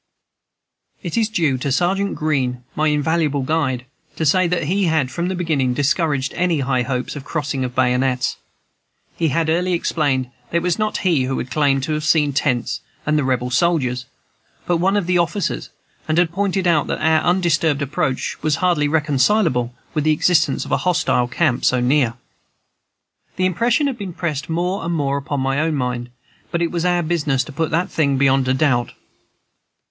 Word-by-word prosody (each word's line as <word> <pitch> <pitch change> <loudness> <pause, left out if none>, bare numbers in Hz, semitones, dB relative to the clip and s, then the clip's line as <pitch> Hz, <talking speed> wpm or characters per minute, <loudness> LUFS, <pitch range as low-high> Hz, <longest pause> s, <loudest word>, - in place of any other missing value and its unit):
It 170 -4 -4
is 225 -2 +1
due 160 - 0
to 140 +2 -2
Sergeant 190 +7 +1
Greene, 130 -5 -1
my 155 +1 +1
invaluable 150 -1 +1
guide, 130 -4 -1 0.3
to 160 - -2
say 185 +5 +3
that 170 -1 0
he 190 +6 +1
had 155 -6 +1
from 170 +6 -2
the 190 - -2
beginning 145 -8 0
discouraged 145 -1 0
any 170 -4 0
high 130 -1 +1
hopes 125 +2 -3
of 145 - -5
a - - -20
crossing 145 -4 -2
of 125 -1 -4
bayonets. 125 0 +1 0.8
He 165 - 0
had 160 +3 0
early 180 +3 +1
explained 140 -7 0 0.2
that 170 - 0
it 170 - -1
was 180 +1 0
not 215 0 0
he 160 -8 +3
who 130 -1 -2
claimed 135 +1 +1
to 155 +2 -1
have 155 0 -2
seen 150 -2 +3
the 135 - -5
tents 125 -5 -1 0.2
and 150 - +1
the 150 - +2
Rebel 125 -1 -1
soldiers, 125 -4 +1 0.6
but 175 - +1
one 190 +4 +2
of 200 - 0
the 180 0 +2
officers, 170 - -1 0.4
and 155 - 0
had 175 -2 +3
pointed 195 0 -1
out 165 -4 +2
that - - -2
our 160 0 +3
undisturbed 165 -5 +1
approach 135 -2 -2
was 155 -2 +1
hardly 170 -3 +1
reconcilable 150 - +2 0.2
with 155 -3 0
the 155 0 +3
existence 165 +2 +2
of - - -9
a - - +3
hostile 175 -8 +1
camp 130 0 0
so 130 - +3
near. 125 -1 +2 1.2
This 185 - 0
impression 230 - +1
had 260 -6 -3
also 190 -3 -5
pressed 155 -3 -3
more 180 +4 -1
and 170 +1 -1
more 140 -2 0
upon 140 0 -3
my 135 +1 0
own 160 0 0
mind, 125 -2 -2 0.4
but 170 - -1
it 170 - -1
was 170 0 -2
our 175 -1 +2
business 150 -5 0
to 150 - -10
put 160 +3 -1
the 170 +3 +1
thing 140 -6 0
beyond 135 -1 +3
a 130 - +2
doubt. 130 -4 +1
155 Hz, 190 wpm, -20 LUFS, 135-175 Hz, 1.2 s, say